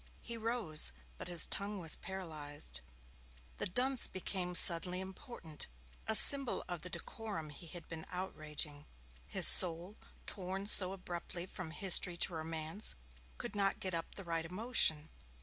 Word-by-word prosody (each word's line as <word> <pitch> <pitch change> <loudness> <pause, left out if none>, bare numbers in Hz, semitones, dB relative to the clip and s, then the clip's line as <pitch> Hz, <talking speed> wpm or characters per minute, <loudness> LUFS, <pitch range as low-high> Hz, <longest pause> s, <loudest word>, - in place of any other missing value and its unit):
He 235 - -5
rose, 220 - +3 0.3
but - - -5
his 175 -2 +4
tongue 200 +1 -2
was 165 -5 0
paralysed. 155 -6 -6 0.8
The - - -2
dunce 250 +7 +1
became 185 -1 -5
suddenly 180 +1 +5
important 190 - -9 0.4
a 220 - +2
symbol 275 +2 +7
of 175 -3 -7
the 180 - -7
decorum 195 -7 -8
he 155 +4 -11
had 170 +2 -7
been 160 -1 -10
outraging. 155 -5 -6 0.4
His - - +1
soul, 175 +3 +6 0.3
torn 190 +1 -7
so 190 -3 +4
abruptly 175 -2 -8
from 185 -2 -9
history 180 0 +1
to 175 - -1
romance, 160 +4 -6 0.4
could - - -8
not 195 -1 -1
get 185 -1 -4
up 165 -1 -6
the 195 - -8
right 165 -2 -3
emotion. 165 -4 +1
180 Hz, 145 wpm, -33 LUFS, 160-195 Hz, 0.8 s, symbol